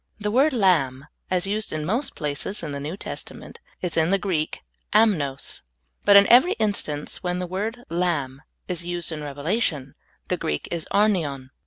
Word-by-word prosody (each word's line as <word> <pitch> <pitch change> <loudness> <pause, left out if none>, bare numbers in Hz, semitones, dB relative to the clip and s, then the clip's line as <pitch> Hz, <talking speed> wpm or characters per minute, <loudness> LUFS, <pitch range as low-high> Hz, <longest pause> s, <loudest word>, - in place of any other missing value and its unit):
The 210 0 -1
word 275 +7 +4
lamb, 155 - +2 0.2
as 180 0 +2
used 210 +2 -1
in 155 -1 -3
most 245 - -1
places 150 +7 -3
in 150 - -4
the 140 - -4
New 155 +6 -5
Testament, - - -7 0.2
is 175 -3 -2
in 160 0 +3
the 195 - +4
Greek 180 -6 -2 0.2
— - - -16
am7ios; 145 -10 -2 0.4
but 200 - +7
in 200 0 +9
every 260 - +6
instance 200 -9 -1
when 180 -1 -1
the 180 - -2
word 215 +7 -4
lamb 160 -6 -1 0.3
is 180 -2 -3
used 175 -1 -2
in 155 -1 -5
Rev 145 -1 -7
elation, 150 - -1 0.3
the - - 0
Greek 75 0 -2
is 170 -2 -3
arnion. 160 -11 +1
175 Hz, 180 wpm, -24 LUFS, 145-205 Hz, 0.4 s, in